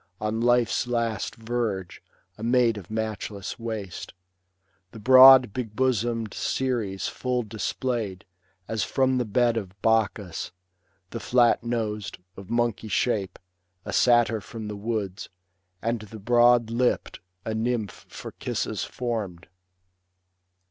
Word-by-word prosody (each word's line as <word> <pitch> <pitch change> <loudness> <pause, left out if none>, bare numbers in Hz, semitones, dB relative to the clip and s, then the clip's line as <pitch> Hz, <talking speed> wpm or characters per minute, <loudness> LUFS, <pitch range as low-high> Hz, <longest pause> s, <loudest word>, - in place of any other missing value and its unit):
On 110 +1 -2
life's 120 0 +2
last 115 -2 -1
verge, 110 -5 -3 0.3
a - - -14
maid 120 0 +3
of 90 - -14
matchless 110 -1 -4
waist; 110 -6 -6 0.8
The 110 - -9
broad, 130 0 +8
big 115 -5 -5
bosom'd, 115 -3 0
Ceres 115 -8 -1
full 125 -1 -2
displayed, 110 -2 -3 0.4
As 110 -3 -1
from 130 -1 +1
the 125 - 0
bed 115 +2 +2
of 95 -3 -6
Bacchus; 105 -5 0 0.6
the 115 - -4
flat 120 -1 +3
nos'd 110 -3 -3 0.2
Of 95 -1 -11
monkey 120 -2 0
shape, 100 -4 0 0.5
a - - -5
Satyr 120 -3 +4
from 110 +2 -7
the 105 - -5
woods; 105 -2 -4 0.5
And 115 +1 0
the 110 +1 -10
broad 120 +1 +4
lipp'd, 125 +2 0 0.3
a 110 - -2
Nymph 110 -1 -2
for - - -8
kisses - - -3
formed. 105 -8 -4
115 Hz, 120 wpm, -26 LUFS, 105-120 Hz, 0.8 s, broad